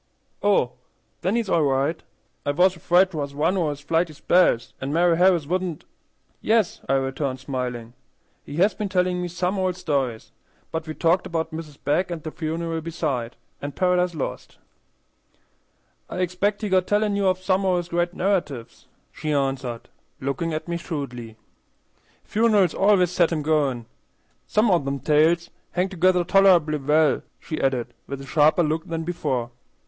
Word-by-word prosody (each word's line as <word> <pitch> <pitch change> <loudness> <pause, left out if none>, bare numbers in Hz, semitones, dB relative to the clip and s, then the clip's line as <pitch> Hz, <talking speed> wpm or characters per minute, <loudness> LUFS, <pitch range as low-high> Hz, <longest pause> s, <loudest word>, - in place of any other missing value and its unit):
"Oh, 200 -12 +3 0.5
then 190 +5 0
he's 235 -3 0
all 170 - +2
right. 140 +3 +1 0.4
I - - -2
was 180 +6 +3
afraid 180 +3 +3
'twas 145 -4 -4
one 160 +6 +1
o' 170 -5 +1
his 145 -1 -5
flighty 165 +2 0
spells, 150 -6 +2
an' 135 +1 -3
Mari' 170 +2 +3
Harris 180 -4 +4
wouldn't" 180 0 -2 0.6
"Yes," 220 -4 +1
I - - +3
returned, 135 0 -1
smiling, 125 -3 -4 0.5
"he 145 - -8
has 190 +5 +3
been 205 +1 -4
telling 180 -1 +1
me 180 - -2
some 180 +3 -2
old 185 -1 0
stories, 140 -10 -2 0.4
but 160 0 -4
we 155 - -5
talked 175 +3 +2
about 165 -2 -2
Mrs. 160 -3 -8
Begg 175 +6 +1
and 170 -3 -5
the 155 - -5
funeral 165 0 -3
beside, 145 -8 -3 0.3
and 145 0 -5
Paradise 180 -1 +1
Lost." 145 - -5 1.5
"I - - -6
expect 185 +4 -1
he 210 - -1
got 185 -1 +2
tellin' 210 0 +1
of 190 -2 +2
you 185 - -21
some 190 +1 +1
o' 185 -2 +2
his 175 -1 -3
great 175 +1 -1
narratives," 170 - -2 0.2
she 155 - -4
answered, 135 -4 -2 0.3
looking 140 +5 -2
at 155 +2 -4
me 170 0 -2
shrewdly. 125 -9 -6 0.9
"Funerals 210 -4 +3
always 195 -3 +3
sets 175 -2 +2
him 155 -3 -1
goin'. 145 -6 +1 0.6
Some 215 0 +3
o' 175 - +4
them 140 -1 -3
tales 160 +4 +2 0.2
hangs 185 +2 0
together 185 0 +3
toler'ble 175 -5 +4
well," 155 -1 +3 0.2
she 155 - -5
added, 125 -3 0
with 140 0 -5
a 135 - -9
sharper 155 +4 +4
look 155 +1 -1
than 165 -1 -3
before. 140 -8 -2
165 Hz, 165 wpm, -24 LUFS, 145-180 Hz, 1.5 s, Harris